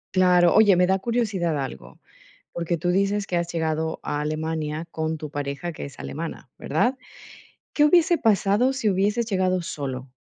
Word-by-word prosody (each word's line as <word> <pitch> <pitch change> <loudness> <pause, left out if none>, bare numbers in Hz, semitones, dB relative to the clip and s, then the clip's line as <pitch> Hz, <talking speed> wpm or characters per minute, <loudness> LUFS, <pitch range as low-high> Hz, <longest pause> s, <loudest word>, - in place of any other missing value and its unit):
Claro. 180 -1 +5
Oye, 205 -4 +6
me 180 0 +4
da 190 0 +3
curiosidad 195 -9 -1
algo, 60 - -8 0.5
porque 170 0 -2
tú 175 +2 -2
dices 200 +2 0
que 180 - -2
has 170 0 -1
llegado 160 -1 -2
a 145 0 -3
Alemania 155 +1 -3
con 160 0 -3
tu 150 -1 -7
pareja, 145 +4 -4
que - - -8
es 140 - -11
alemana, 160 -4 -6
¿verdad? 240 - 0 0.8
¿Qué 295 - +4
hubiese 340 +1 +4
pasado 220 +3 +2
si 245 -5 0
hubieses 205 +5 +1
llegado 185 -3 +1
solo? 135 -5 -5
175 Hz, 165 wpm, -24 LUFS, 155-205 Hz, 0.8 s, Oye